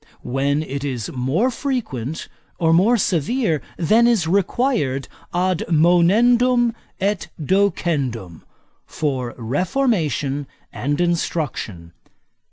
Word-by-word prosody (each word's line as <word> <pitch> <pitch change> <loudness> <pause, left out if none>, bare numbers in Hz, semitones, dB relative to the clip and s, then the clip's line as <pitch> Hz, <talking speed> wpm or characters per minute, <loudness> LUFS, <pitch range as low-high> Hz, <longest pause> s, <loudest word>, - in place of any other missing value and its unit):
When 140 +4 0
it 140 -1 -5
is 125 -6 -3
more 140 - 0
frequent 185 - -3 0.3
or 165 -1 +2
more 205 +8 +4
severe 185 - 0 0.2
than 220 +8 +4
is 225 -8 +2
required 190 - 0 0.2
ad 180 0 0
monendum 230 +9 +4 0.3
et 200 -1 -1
docendum, 145 - 0 0.5
for 130 -5 -3
reformation 145 - -1 0.3
and 145 +3 -2
instruction. 150 - -2
165 Hz, 90 wpm, -21 LUFS, 135-210 Hz, 0.5 s, more